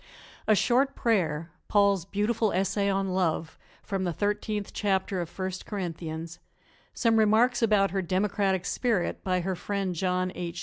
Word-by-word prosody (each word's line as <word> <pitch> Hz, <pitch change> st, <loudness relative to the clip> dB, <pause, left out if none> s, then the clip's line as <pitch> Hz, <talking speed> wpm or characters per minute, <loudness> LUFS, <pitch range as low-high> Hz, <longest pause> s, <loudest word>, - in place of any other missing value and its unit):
A 215 Hz, -, +5 dB
short 265 Hz, +6 st, +2 dB
prayer, 170 Hz, -8 st, 0 dB, 0.2 s
Paul's 200 Hz, -4 st, +3 dB
beautiful 210 Hz, +2 st, 0 dB
essay 195 Hz, +2 st, +1 dB
on 195 Hz, 0 st, 0 dB
"Love" 165 Hz, -3 st, -1 dB, 0.2 s
from 195 Hz, -1 st, -2 dB
the 180 Hz, -, 0 dB
Thirteenth 205 Hz, +2 st, -2 dB
Chapter 190 Hz, -2 st, 0 dB
of 170 Hz, -, -5 dB
First 185 Hz, 0 st, -5 dB
Corinthians, 165 Hz, -4 st, -5 dB, 0.6 s
some 230 Hz, -2 st, +3 dB
remarks 225 Hz, +3 st, +4 dB
about 205 Hz, -4 st, +3 dB
her 195 Hz, 0 st, 0 dB
democratic 190 Hz, +1 st, 0 dB
spirit 225 Hz, -7 st, -1 dB
by 185 Hz, -1 st, +1 dB
her 190 Hz, +1 st, -2 dB
friend, 195 Hz, +1 st, -2 dB
John 185 Hz, +1 st, 0 dB
H. 175 Hz, 0 st, -5 dB
195 Hz, 145 wpm, -28 LUFS, 180-210 Hz, 0.6 s, A